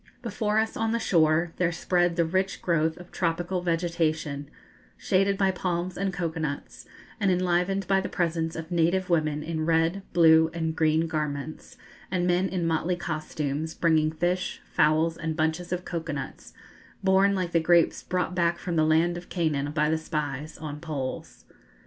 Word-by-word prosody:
Before 215 -2 -1
us, 220 0 +1
on 225 0 0
the 235 - +1
shore, 165 -4 +2
there 175 -1 +1
spread 175 0 +1
the 170 -1 +2
rich 190 +4 -1
growth 160 -2 +1
of 180 0 -13
tropical 175 +1 -1
vegetation, 165 -4 -1 0.5
shaded 195 +1 +1
by 195 -1 +3
palms 180 -1 -2
and 195 0 -1
cocoa 170 -3 -3
nuts, 145 -3 -5 0.3
and 200 -2 +2
enlivened 180 +2 +1
by 195 -1 +3
the - - -4
presence 165 -2 -1
of 160 +1 -7
native 175 +2 +1
women 155 -2 +1
in 160 0 -3
red, 165 +4 +1
blue, 160 -1 +6
and 160 -1 -2
green 160 0 +2
garments, 150 -2 -4 0.3
and 180 -1 0
men 180 +1 +2
in 180 -2 -2
motley 165 +2 0
costumes, 155 -2 -3
bringing 160 -2 +3
fish, 175 +3 -1
fowls, 155 +2 +3
and 160 -1 -3
bunches 160 +3 -1
of 180 0 -2
cocoa 165 -2 -4
nuts, 140 - -7 0.5
borne, 195 +1 +4
like 180 -2 -2
the 170 - +3
grapes 170 0 +3
brought 180 0 -2
back 170 -1 +1
from 170 -1 -3
the 155 - +4
land 165 +2 +2
of 175 - -10
Canaan 150 -5 -1
by 150 0 +1
the 160 - +1
spies, 150 -1 -4
on 150 -1 -6
poles. 150 -5 -5
170 Hz, 170 wpm, -27 LUFS, 155-180 Hz, 0.5 s, blue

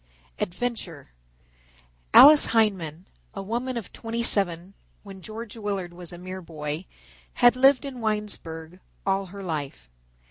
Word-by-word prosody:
ADVENTURE 180 - -4 1.0
Alice 300 0 +9
Hindman, 190 -7 +1 0.3
a 195 - -5
woman 240 +5 -3
of 225 - -7
twenty 230 +1 -4
seven 185 -4 +1 0.3
when 195 -2 -11
George 220 +3 -8
Willard 200 -5 -4
was 175 -1 -9
a 175 - -9
mere 185 +1 -7
boy, 155 0 -6 0.5
had 245 0 +5
lived 270 +1 +4
in 260 -3 -7
Winesburg 185 -6 -4 0.3
all 195 0 0
her 200 +2 -9
life. 140 - -5
195 Hz, 130 wpm, -25 LUFS, 170-225 Hz, 1.0 s, Alice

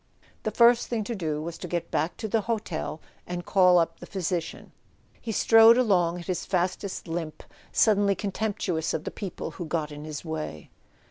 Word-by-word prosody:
The - - -1
first 235 0 +5
thing 230 -3 -1
to 235 - -4
do 155 -7 -3
was 170 +1 -6
to 180 - -6
get 175 0 -3
back 160 +3 -1
to 220 - -4
the 220 +1 +1
hotel 205 -8 -3 0.3
and 175 0 -5
call 180 -2 +5
up 165 -1 +1
the - - -10
physician. 180 -3 -3 0.5
He 230 - -4
strode 225 +2 +7
along 180 -8 +2
at 175 - -9
his 180 0 -2
fastest 185 +1 -2
limp, 165 -2 -5 0.3
suddenly 205 -2 +3
contemptuous 190 -5 -2
of 155 - -3
the - - -5
people 195 -4 -6
who 175 - -6
got 155 -2 -2
in 150 0 -8
his 155 +1 -7
way. 155 - -5
180 Hz, 185 wpm, -27 LUFS, 160-205 Hz, 0.5 s, strode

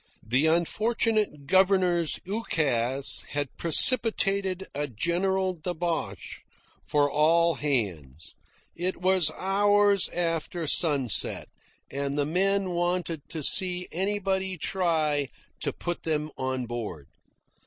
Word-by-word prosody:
The 130 +7 +2
unfortunate 210 0 0
governor's 180 -1 +2
ukase 140 - 0
had 145 -2 -3
precipitated 195 - +3
a 145 +1 -3
general 185 - -1
debauch 165 - -4 0.4
for 145 -1 +1
all 165 +3 +3
hands. 95 - -3 0.4
It 180 +1 0
was 185 -2 +3
hours 205 +1 +2
after 170 0 -2
sunset, 140 - +2 0.4
and 140 +1 -3
the 145 - +1
men 190 +4 +1
wanted 175 -3 -2
to 160 -3 -5
see 180 +2 +1
anybody 190 0 -1
try 155 -6 0 0.3
to - - -2
put 175 0 -5
them 155 -1 -2
on 130 -1 -3
board. 110 - -6
170 Hz, 100 wpm, -26 LUFS, 145-190 Hz, 0.4 s, precipitated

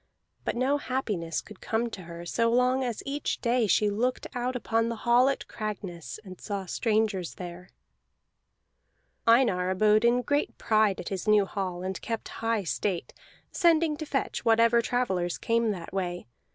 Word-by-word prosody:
But - - -1
no 265 +4 +1
happiness 210 - -2
could 210 - -14
come 230 +1 -1
to 190 - -7
her 170 0 -9
so 230 +6 +1
long 250 +2 +3
as 240 -4 -3
each 285 +1 -2
day 240 -2 +2
she 210 +1 +3
looked 245 +5 -1
out 250 +1 -2
upon 230 -1 0
the 230 - -2
hall 245 +3 +5
at 275 - -3
Cragness, 200 -6 -5
and 185 -1 -10
saw 200 -3 -4
strangers 210 -2 0
there. 180 0 -8 1.6
Einar 225 -7 +4
abode 210 +3 +4
in 240 +1 +3
great 285 +4 0
pride 215 -3 +2
at - - -5
his 195 +1 -4
new 210 -2 +5
hall, 185 -3 -4
and 190 0 -4
kept 225 -1 -4
high 225 -2 +1
state, 180 0 -2 0.4
sending 330 -3 +3
to 310 -1 -6
fetch 270 - -2
whatever 230 0 +4
travellers 190 -8 -1
came 230 0 +1
that 180 -5 -5
way. 180 -2 -3
220 Hz, 165 wpm, -28 LUFS, 190-245 Hz, 1.6 s, hall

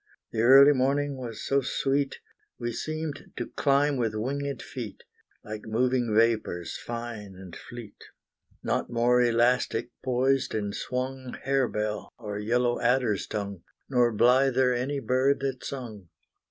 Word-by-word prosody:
The 110 - -1
early 135 +4 +8
morning 140 +2 +1
was 120 -4 -7
so 140 0 +2
sweet, 135 +1 -1 0.4
We 120 0 -3
seemed 155 +2 -5
to - - -3
climb 140 0 +2
with 115 -3 -1
winged 140 +5 -3
feet, 120 -6 -7 0.4
Like 105 0 -7
moving 120 0 +1
vapors 110 -7 +1
fine 115 -4 -6
and 90 -2 -11
fleet, 120 -4 -10 0.6
Not - - -1
more 120 +1 +3
elastic 120 0 +2
poised 130 +1 +1
and 105 -2 -2
swung 130 +2 -4
Harebell 115 -6 -1
or 105 -3 -5
yellow 120 +3 +1
adder's 125 -5 +1
tongue, 100 -4 -4 0.3
Nor 125 -3 +3
blither 125 +2 +4
any 135 +4 -1
bird 130 +3 +2
that 135 -2 -3
sung. 110 -9 -7
125 Hz, 130 wpm, -27 LUFS, 110-135 Hz, 0.6 s, early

